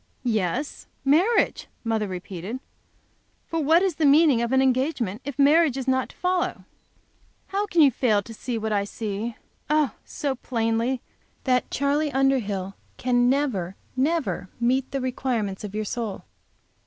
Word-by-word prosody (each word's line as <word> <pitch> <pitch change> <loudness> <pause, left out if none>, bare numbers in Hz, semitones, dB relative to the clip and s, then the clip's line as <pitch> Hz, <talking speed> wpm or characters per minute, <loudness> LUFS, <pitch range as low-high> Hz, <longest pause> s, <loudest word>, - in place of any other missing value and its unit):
"Yes, 230 - -1 0.2
marriage!" 350 +12 +3 0.2
mother 220 -2 0
repeated. 185 +5 -6 0.9
"For 330 - -2
what 325 +5 +5
is 370 -5 0
the 315 - +2
meaning 285 -4 +5
of 235 0 -1
an 265 - +4
engagement 255 - +1
if 280 -3 -5
marriage 290 0 +5
is 265 -1 -4
not 260 0 +1
to - - -16
follow? 360 -1 -1 0.9
How 405 +1 -1
can 340 -5 +4
you 280 - +6
fail 215 -4 +2
to 225 - -10
see, 240 +1 -4
what 220 0 -2
I 200 -1 +2
see, 215 +2 -4 0.3
oh! 300 -5 +3
so 285 -3 -3
plainly, 235 0 -1 0.4
that 250 -2 +1
Charley 285 +2 +1
Underhill 220 -9 +1 0.2
can 245 -1 +2
never, 240 -10 0 0.2
never 260 - 0
meet 255 +2 +1
the 275 - -2
requirements 240 -6 -2
of 205 -1 -6
your 215 0 -1
soul. 220 -2 -4
255 Hz, 150 wpm, -25 LUFS, 220-285 Hz, 0.9 s, you